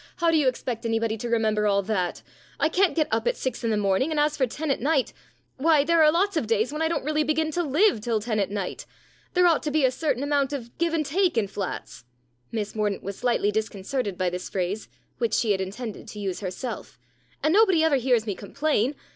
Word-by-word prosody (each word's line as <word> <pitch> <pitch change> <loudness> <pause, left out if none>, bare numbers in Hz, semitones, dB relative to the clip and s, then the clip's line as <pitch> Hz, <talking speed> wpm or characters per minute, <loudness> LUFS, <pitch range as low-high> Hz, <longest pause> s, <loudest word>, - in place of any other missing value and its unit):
How 335 -1 +2
do 325 - +4
you 295 -3 +3
expect 245 -2 -2
anybody 225 -1 0
to 235 +2 -5
remember 215 -2 +1
all 200 -1 +2
that? 185 -4 -2 0.4
I 315 - +3
can't 370 +2 +2
get 310 -2 +2
up - - 0
at - - +1
six 255 -2 -3
in 230 - +1
the 215 - +1
morning, 200 +7 +1
and 310 -2 0
as 300 0 +2
for 260 -3 +1
ten 300 +5 -3
at 270 - -1
night 280 -1 +1 0.4
why, 305 +1 +4
there 335 +2 +3
are 305 -1 +7
lots 390 +4 +1
of 305 -9 0
days 225 +4 +1
when 305 - -3
I 320 - +3
don't 330 -4 -2
really 305 0 +1
begin 310 +1 0
to 350 - 0
live 315 - +2
till 225 0 0
ten 215 0 -2
at 200 - 0
night. 200 -2 -4 0.5
There 360 0 +5
ought 330 -4 +4
to 300 - -2
be 300 -2 +2
a 255 - +3
certain 270 -1 -1
amount 285 -1 +1
of 240 -4 -6
give 335 -1 +1
and 310 -2 0
take 355 0 +1
in 215 -3 +2
flats" 185 -10 -6 0.5
Miss 210 -2 -3
Mordaunt 210 -2 -1
was 200 +1 -6
slightly 235 -4 +1
disconcerted 210 0 -2
by 185 -1 0
this 180 0 -5
phrase, 190 +3 -3 0.3
which 465 - +1
she 225 -4 +2
had 190 -1 +1
intended 210 +3 -6
to 210 - -8
use 195 -3 -3
herself 195 +6 -6 0.5
"and 310 - +3
nobody 385 -6 +5
ever 315 -3 +4
hears 245 -3 +2
me 205 - -2
complain. 265 +5 -1
250 Hz, 235 wpm, -25 LUFS, 210-310 Hz, 0.5 s, are